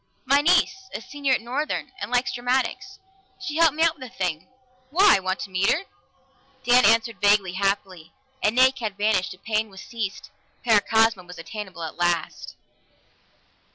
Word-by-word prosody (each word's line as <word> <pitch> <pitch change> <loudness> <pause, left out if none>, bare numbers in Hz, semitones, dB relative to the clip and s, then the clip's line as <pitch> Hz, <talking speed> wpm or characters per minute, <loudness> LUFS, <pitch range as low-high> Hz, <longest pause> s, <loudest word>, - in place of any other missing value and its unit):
"My 280 +2 +4
niece, 350 +4 +3 0.2
a - - -3
senior 280 +3 -2
at 250 - +1
Northern, 265 +6 -3
and - - -5
likes 250 +1 0
dramatics. 255 +10 -2 0.4
She 320 -5 -5
helped 330 -3 +4
me 320 - +1
out 330 -2 +1
with 255 -1 -8
the 255 - -22
thing. 170 -4 -2 0.4
Why? 370 - +5
Want 185 0 -3
to 200 - -7
meet 185 +2 +1
her?" 330 - 0 0.8
Dan 250 0 +5
answered 225 0 +2
vaguely, 205 -2 +3
happily. 185 -3 -2 0.3
An 215 +3 +1
ache 260 +1 +4
had 215 -4 -4
vanished; 205 -4 0
a - - -24
pain 215 +2 -2
was 195 +6 -13
eased. 215 -4 -5 0.3
Paracosma 225 -1 +3
was 180 0 -12
attainable 190 -1 -8
at 160 - -7
last! 175 -1 -2
225 Hz, 165 wpm, -24 LUFS, 190-260 Hz, 0.8 s, Why